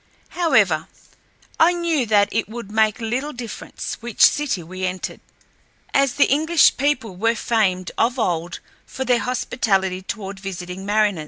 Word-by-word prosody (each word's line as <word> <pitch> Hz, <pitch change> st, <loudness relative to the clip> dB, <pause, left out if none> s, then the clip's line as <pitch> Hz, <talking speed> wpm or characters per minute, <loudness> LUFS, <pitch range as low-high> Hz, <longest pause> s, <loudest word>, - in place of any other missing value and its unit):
However, 215 Hz, -, +2 dB, 0.7 s
I 340 Hz, +2 st, +5 dB
knew 335 Hz, -7 st, 0 dB
that 205 Hz, -1 st, +4 dB
it 225 Hz, -1 st, -1 dB
would 225 Hz, -3 st, -8 dB
make 220 Hz, +1 st, +2 dB
little 250 Hz, +6 st, -3 dB
difference 240 Hz, -3 st, -7 dB
which 235 Hz, -2 st, -5 dB
city 280 Hz, -, +1 dB
we 185 Hz, +3 st, -8 dB
entered, 185 Hz, 0 st, -4 dB, 0.7 s
as 275 Hz, -2 st, +2 dB
the 285 Hz, -, +5 dB
English 315 Hz, +4 st, +4 dB
people 255 Hz, -8 st, 0 dB
were 230 Hz, +5 st, +1 dB
famed 195 Hz, -6 st, 0 dB
of 240 Hz, +3 st, +2 dB
old 175 Hz, -6 st, -2 dB, 0.3 s
for 265 Hz, -, -5 dB
their 245 Hz, -1 st, +3 dB
hospitality 200 Hz, -5 st, -1 dB
toward 195 Hz, -1 st, -6 dB
visiting 190 Hz, 0 st, -7 dB
mariners. 205 Hz, -3 st, +2 dB
220 Hz, 145 wpm, -21 LUFS, 190-255 Hz, 0.7 s, I